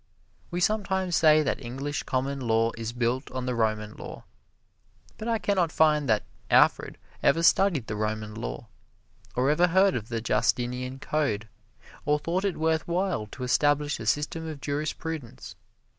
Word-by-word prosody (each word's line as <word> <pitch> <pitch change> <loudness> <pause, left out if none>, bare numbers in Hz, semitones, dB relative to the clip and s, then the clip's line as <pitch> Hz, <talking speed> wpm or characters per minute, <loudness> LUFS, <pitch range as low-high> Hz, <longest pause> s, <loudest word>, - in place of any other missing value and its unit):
We 175 - -3
sometimes 190 -3 +1
say 155 -1 +5
that 140 - -2
English 135 +4 -4
Common 135 +2 -2
Law 115 -1 +2
is 115 0 -4
built 120 +2 -1
on 130 0 -4
the 125 - -1
Roman 110 -2 -1
Law, - - -9 1.0
but 220 - -5
I 230 -1 +2
can 205 -2 -1
not 170 -3 +2
find 150 -4 +3
that 110 -1 +3 0.3
Alfred - - +4 0.2
ever 165 +4 +3
studied 170 - +4
the 105 - -4
Roman 110 0 -3
Law, - - -6 0.7
or 130 +3 +2
ever 175 +4 +4
heard 190 +2 +4
of 110 -2 -4
the 115 -1 -2
Justinian 125 +2 0
Code, 135 -7 -1 0.6
or 150 0 +2
thought 175 +6 -2
it 195 - -1
worth 160 0 0
while 175 - -1
to 125 +4 -8
establish 145 +2 +2
a 115 - -6
system 150 +6 -1
of 155 -3 -6
jurisprudence. 145 -2 -4
145 Hz, 160 wpm, -27 LUFS, 120-160 Hz, 1.0 s, say